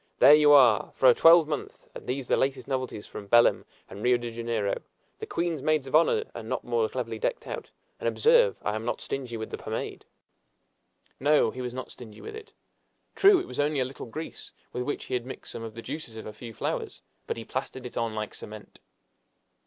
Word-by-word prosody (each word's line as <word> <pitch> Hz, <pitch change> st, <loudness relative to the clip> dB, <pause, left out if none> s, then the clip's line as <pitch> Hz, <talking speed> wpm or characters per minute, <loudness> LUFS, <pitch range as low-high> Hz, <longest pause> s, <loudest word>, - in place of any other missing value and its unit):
There 135 Hz, +4 st, +8 dB
you 150 Hz, -1 st, +6 dB
are, 125 Hz, -8 st, +6 dB
for 130 Hz, -, +6 dB
a -, -, +8 dB
twelvemonth! 165 Hz, 0 st, +4 dB
and -, -, -10 dB
these 130 Hz, +1 st, -2 dB
are -, -, -1 dB
the -, -, +4 dB
latest 135 Hz, +1 st, -1 dB
novelties 130 Hz, -6 st, -3 dB
from 100 Hz, -, -9 dB
Belem 120 Hz, +3 st, +4 dB, 0.2 s
and 100 Hz, -, -10 dB
Rio 125 Hz, +1 st, +4 dB
de 120 Hz, -1 st, -6 dB
Janeiro! 115 Hz, -3 st, -2 dB, 0.4 s
The -, -, -6 dB
queen's 170 Hz, -4 st, -2 dB
maids 155 Hz, -1 st, +1 dB
of 135 Hz, -, -9 dB
honor 170 Hz, -, +4 dB
are -, -, -6 dB
not -, -, -4 dB
more 460 Hz, -1 st, 0 dB
cleverly 460 Hz, -, -4 dB
decked -, -, -2 dB
out; -, -, -6 dB, 0.3 s
and -, -, 0 dB
observe, 485 Hz, +1 st, +4 dB
I 105 Hz, -, -1 dB
am 110 Hz, +1 st, -3 dB
not 120 Hz, -, -2 dB
stingy 125 Hz, -4 st, -4 dB
with 110 Hz, -, -6 dB
the -, -, -5 dB
pomade!" -, -, -5 dB, 1.1 s
No, 150 Hz, +3 st, +3 dB
he 130 Hz, -, -7 dB
was 125 Hz, 0 st, -5 dB
not 130 Hz, -, -6 dB
stingy 110 Hz, -4 st, -12 dB
with -, -, -8 dB
it. 440 Hz, 0 st, -11 dB, 0.6 s
True, 395 Hz, -2 st, +6 dB
it 365 Hz, -, -5 dB
was -, -, -7 dB
only 145 Hz, 0 st, +1 dB
a 130 Hz, -, +1 dB
little 130 Hz, 0 st, -8 dB
grease, 155 Hz, +8 st, -7 dB, 0.2 s
with 125 Hz, -, -2 dB
which 145 Hz, +4 st, -3 dB
he -, -, -6 dB
had 125 Hz, -1 st, 0 dB
mixed 130 Hz, -, -8 dB
some -, -, -7 dB
of 110 Hz, -1 st, -7 dB
the 115 Hz, -, -8 dB
juices 150 Hz, -8 st, -6 dB
of 110 Hz, -, -8 dB
a 105 Hz, -, -7 dB
few 115 Hz, +2 st, -9 dB
flowers, 110 Hz, -, -4 dB, 0.2 s
but -, -, -2 dB
he 115 Hz, -, -7 dB
plastered 130 Hz, -1 st, -5 dB
it 125 Hz, -, -8 dB
on 115 Hz, -2 st, -2 dB
like 105 Hz, -1 st, -4 dB
cement! 105 Hz, 0 st, -11 dB
130 Hz, 220 wpm, -27 LUFS, 115-155 Hz, 1.1 s, There